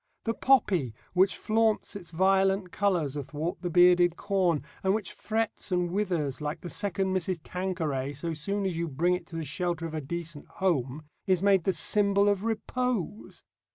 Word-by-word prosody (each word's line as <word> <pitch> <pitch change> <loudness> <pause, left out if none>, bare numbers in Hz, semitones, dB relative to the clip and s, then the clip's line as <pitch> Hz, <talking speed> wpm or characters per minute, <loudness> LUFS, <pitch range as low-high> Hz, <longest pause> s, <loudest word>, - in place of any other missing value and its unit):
The 225 - 0
poppy 190 - +2 0.2
which 190 +2 +3
flaunts 220 -1 +1
its 180 -4 -8
violent 190 +1 +2
colours 175 -9 0
athwart 150 +4 -4
the 180 - -2
bearded 175 0 +5
corn, 185 -7 0 0.2
and 190 +1 +3
which 215 -3 -4
frets 220 -2 -2
and 180 -1 +1
withers 175 -9 -1
like 150 0 -3
the 175 - -6
Second 195 -1 -1
Mrs. 185 0 -1
Tanqueray 160 -8 -2
so 165 +4 -4
soon 200 +6 -2
as 185 -3 -1
you 170 +1 -2
bring 165 +5 +1
it 180 -1 -4
to 170 - -10
the 165 -1 -3
shelter 170 +3 -2
of 165 - -6
a 155 - -2
decent 165 +1 -6
home, 150 -6 -1 0.2
is 185 -1 +2
made 195 -4 +4
the 190 - +3
symbol 200 +4 +3
of 200 -1 0
Repose. 225 -2 -3
180 Hz, 175 wpm, -28 LUFS, 165-200 Hz, 0.2 s, bearded